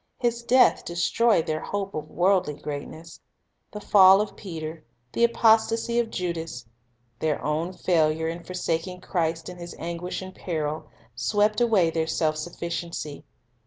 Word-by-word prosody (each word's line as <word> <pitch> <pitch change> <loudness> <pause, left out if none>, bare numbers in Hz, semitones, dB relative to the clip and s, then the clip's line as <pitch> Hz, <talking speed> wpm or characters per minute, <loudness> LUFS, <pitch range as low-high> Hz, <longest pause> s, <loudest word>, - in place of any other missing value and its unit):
His 235 -1 0
death 250 +2 +4
destroyed 175 +3 +2
their 155 0 -1
hope 195 +3 -4
of 155 0 -5
worldly 180 -4 +2
greatness. 155 +3 -7 0.5
The 210 - -6
fall 195 -2 +7
of 210 0 -2
Peter, 160 -4 -7 0.3
the 235 - 0
apostasy 230 0 +3
of 235 -1 0
Judas, 165 - -4 0.5
their 155 -2 0
own 155 +4 -1
failure 160 -3 +1
in 170 +1 -5
forsaking 180 0 -3
Christ 165 -3 -1
in 180 - -8
His 175 0 -8
anguish 170 +2 -4
and 185 0 -9
peril, 155 -4 -4 0.2
swept 205 - +1
away 205 -8 +3
their 160 -1 -1
self 155 -1 0
sufficiency. 170 -2 -5
175 Hz, 140 wpm, -25 LUFS, 160-200 Hz, 0.5 s, fall